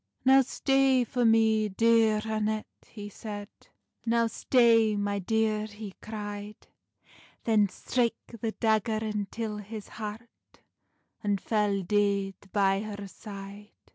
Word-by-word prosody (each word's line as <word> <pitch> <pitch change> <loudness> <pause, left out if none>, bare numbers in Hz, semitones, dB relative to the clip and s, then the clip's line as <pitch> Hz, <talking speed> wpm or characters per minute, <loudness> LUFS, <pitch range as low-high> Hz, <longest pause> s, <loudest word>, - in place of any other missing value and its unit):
"Now 265 +1 +7
stay 270 0 +2
for 245 0 -1
me, 220 -1 +4
dear 225 +1 +3
Annet," 215 0 -1 0.2
he 205 -2 -8
sed, 205 0 -7 0.5
"Now 230 0 +2
stay, 230 -1 +3
my 205 0 -1
dear," 215 +2 0
he 205 -2 -9
cry'd; 205 -1 -7 0.8
Then 215 -3 +3
strake 240 +4 0 0.3
the 225 -1 -2
dagger 220 -1 +1
untill 215 0 -3
his 210 0 -8
heart, 220 +2 -9 0.6
And 205 -1 +1
fell 205 -2 0
deid 200 0 +1 0.2
by 195 -1 +2
her 205 -2 -6
side. 200 0 -10
215 Hz, 115 wpm, -28 LUFS, 205-225 Hz, 0.8 s, Now